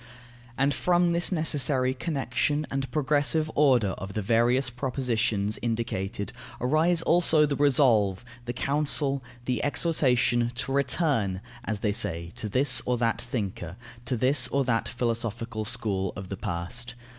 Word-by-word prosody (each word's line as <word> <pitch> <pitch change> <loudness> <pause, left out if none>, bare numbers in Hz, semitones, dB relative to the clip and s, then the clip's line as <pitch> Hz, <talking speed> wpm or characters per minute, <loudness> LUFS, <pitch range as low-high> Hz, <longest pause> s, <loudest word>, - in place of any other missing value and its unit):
And 140 +1 +2
from 175 +4 +2
this 170 +2 +2
necessary 145 -6 +1
connection 145 0 -1
and 135 -1 -2
progressive 150 +2 +1
order 130 -8 +3
of 95 +1 -7
the 105 - -2
various 120 +4 +2
propositions 120 -5 -1
indicated 110 -4 -3 0.3
arise 160 +6 +2
also 165 -3 +4
the 145 -1 -1
resolve, 120 -9 +3 0.2
the 120 - -3
counsel, 140 0 +1 0.2
the 125 -2 -1
exhortation, 125 -6 +1
to 135 - -4
"return," 135 - +1 0.3
as 105 -2 -3
they 105 - +1
say, 85 -5 -1
to 110 - -2
this 130 +7 +3
or 125 0 +1
that 115 -1 0
thinker, 100 -7 -4 0.3
to 125 -1 -1
this 130 +3 +3
or 140 0 0
that 115 -3 0
philosophical 115 -2 -3
school 105 -5 -1
of 95 -1 -8
the 100 - -5
past. 120 +10 -4
125 Hz, 140 wpm, -27 LUFS, 110-145 Hz, 0.3 s, also